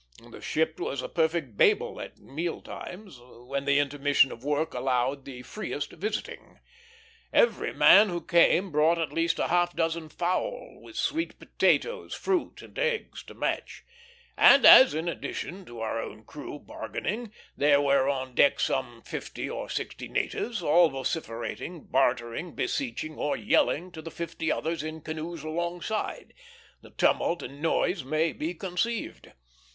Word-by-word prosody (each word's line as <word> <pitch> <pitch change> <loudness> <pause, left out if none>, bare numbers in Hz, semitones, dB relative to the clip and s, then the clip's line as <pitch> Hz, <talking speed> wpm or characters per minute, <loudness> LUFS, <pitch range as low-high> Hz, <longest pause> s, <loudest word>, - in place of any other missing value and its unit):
The - - -11
ship 160 0 -1
was 135 -2 -3
a - - -3
perfect 160 -8 -1
Babel - - +3
at - - -9
meal 165 +5 -4
times, 185 - -9
when 125 +3 -6
the 140 0 +3
intermission 145 -1 +3
of 115 - -10
work 150 +3 -1
allowed 130 +2 0
the 125 -2 -9
freest 145 -5 -5
visiting. 215 +2 -5 0.7
Every - - +3
man 210 +1 +7
who 175 -1 -2
came 175 +2 +4
brought 155 +3 +3
at 165 -2 -2
least 165 0 +1
a - - -1
half 175 0 +2
dozen 165 -1 -1
fowl, - - -3
with - - -13
sweet 325 +2 -1
potatoes, 480 -1 0
fruit, 375 -3 -2
and - - -10
eggs, 475 -2 -1
to - - -12
match; - - -3 0.5
and 280 -1 +7
as, 260 - +10
in 160 +2 -2
addition 180 +2 -5
to 120 -5 -9
our 115 0 -2
own 110 +1 -8
crew 150 +2 -8
bargaining, 220 +8 -5 0.2
there 145 0 +4
were 140 -1 +3
on 130 -2 -2
the - - -23
deck 285 - +4
some - - -1
fifty - - -5
or - - -5
sixty - - -4
natives, 240 - -2
all 165 +2 +5
vociferating, 135 +3 -4
bartering, 130 +4 0
beseeching, 235 - -3
or 150 - -1
yelling 180 +4 +1
to 160 -2 -9
the 165 - -7
fifty 165 -1 -3
others 160 0 -2
in 155 +1 -6
canoes 160 +1 -6
alongside, 175 +6 -3 0.5
the - - -15
tumult 170 - +1
and 140 +3 -9
noise 165 +1 +1
may 155 +4 0
be 165 +3 -4
conceived. 195 +6 -3
160 Hz, 155 wpm, -28 LUFS, 140-180 Hz, 0.7 s, as